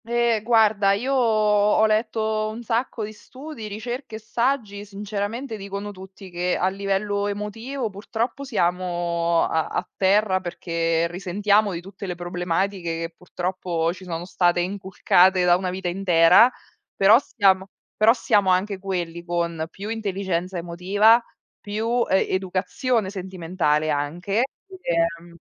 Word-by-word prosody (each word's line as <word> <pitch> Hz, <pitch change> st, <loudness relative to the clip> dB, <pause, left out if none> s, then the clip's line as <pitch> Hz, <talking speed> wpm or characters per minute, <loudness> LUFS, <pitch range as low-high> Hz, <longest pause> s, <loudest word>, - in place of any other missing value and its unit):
Eh 235 Hz, -1 st, +1 dB
guarda, 215 Hz, -3 st, +4 dB
io 250 Hz, +7 st, -1 dB
ho 215 Hz, -4 st, +3 dB
letto 220 Hz, 0 st, 0 dB
un 225 Hz, +2 st, -7 dB
sacco 230 Hz, 0 st, -1 dB
di 215 Hz, -, -8 dB
studi, 260 Hz, +1 st, -10 dB
ricerche 240 Hz, +3 st, -6 dB
e -, -, -6 dB
saggi 225 Hz, -2 st, -1 dB
sinceramente 210 Hz, +4 st, -4 dB
dicono 200 Hz, +1 st, -6 dB
tutti 190 Hz, 0 st, -12 dB
che 180 Hz, +1 st, -1 dB
a 185 Hz, -, +1 dB
livello 200 Hz, +1 st, -1 dB
emotivo 225 Hz, +4 st, -4 dB
purtroppo 225 Hz, +6 st, -4 dB
siamo 175 Hz, -6 st, 0 dB
a 160 Hz, -1 st, 0 dB
a -, -, -3 dB
terra 195 Hz, 0 st, +3 dB
perché 165 Hz, -2 st, -1 dB
risentiamo 200 Hz, +4 st, +1 dB
di 170 Hz, -2 st, -5 dB
tutte 195 Hz, +2 st, -9 dB
le 180 Hz, -, -3 dB
problematiche 180 Hz, +2 st, -2 dB, 0.2 s
che 165 Hz, 0 st, -5 dB
purtroppo 175 Hz, -2 st, -2 dB
ci 185 Hz, -, -13 dB
sono 170 Hz, -1 st, -5 dB
state 175 Hz, -1 st, +1 dB
inculcate 185 Hz, -1 st, +2 dB
da 175 Hz, 0 st, +6 dB
una 185 Hz, 0 st, -2 dB
vita 185 Hz, 0 st, -4 dB
intera, 180 Hz, +5 st, +5 dB, 0.4 s
però 205 Hz, +4 st, +6 dB
siamo 195 Hz, -8 st, +2 dB, 0.3 s
però 215 Hz, +1 st, +5 dB
siamo 210 Hz, -5 st, +2 dB
anche 190 Hz, +2 st, +1 dB
quelli 175 Hz, -3 st, -4 dB
con 170 Hz, -2 st, -2 dB
più 200 Hz, +4 st, -8 dB
intelligenza 190 Hz, -4 st, -2 dB
emotiva, 195 Hz, +7 st, +3 dB, 0.4 s
più 225 Hz, +4 st, -1 dB
e 190 Hz, -, +3 dB
educazione 190 Hz, +4 st, -1 dB
sentimentale 175 Hz, -5 st, -1 dB
anche. 175 Hz, -, -1 dB, 0.4 s
Ehm 170 Hz, -, -1 dB
195 Hz, 130 wpm, -23 LUFS, 175-215 Hz, 0.4 s, da